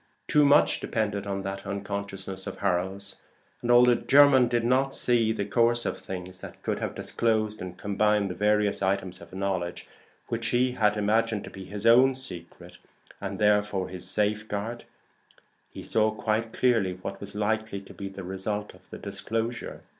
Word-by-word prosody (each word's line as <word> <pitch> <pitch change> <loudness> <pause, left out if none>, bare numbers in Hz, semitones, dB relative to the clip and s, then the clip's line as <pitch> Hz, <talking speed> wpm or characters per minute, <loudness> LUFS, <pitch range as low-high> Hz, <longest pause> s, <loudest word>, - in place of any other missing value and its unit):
Too 150 - +4
much 145 +1 +5
depended 105 -2 -2
on 100 -1 -3
that 95 +1 -5
unconsciousness 100 -1 -5
of - - -6
Harold's; 95 +2 -1 0.4
and 120 - -4
although 120 0 +7
Jermyn 135 0 +6
did 120 -1 0
not 130 +2 +2
see 115 -3 +2
the 105 -3 -2
course 120 +3 +2
of - - -1
things 90 -1 -7
that - - -11
could - - -1
have - - -3
disclosed 110 -2 -1
and 90 -1 -7
combined 105 -1 +1
the - - -3
various 105 +2 +1
items 95 -2 -1
of 85 - -13
knowledge 95 -2 -3 0.4
which - - -2
he 125 +1 +2
had 105 -3 +2
imagined 110 +1 +1
to - - -9
be 95 0 -9
his 105 +3 -7
own 130 +3 +6
secret, 90 -11 -10 0.4
and - - -4
therefore 105 -2 +2
his 90 -1 -7
safeguard, 105 +2 -2 0.8
he - - -9
saw 110 0 +2
quite 110 +1 -1
clearly 115 -8 +2
what 95 +2 -7
was 100 0 -8
likely 110 0 -1
to 100 - -13
be 100 -1 -6
the 95 0 -8
result 100 +3 -4
of - - -21
the - - -8
disclosure. 115 +2 -4
105 Hz, 170 wpm, -27 LUFS, 95-115 Hz, 0.8 s, although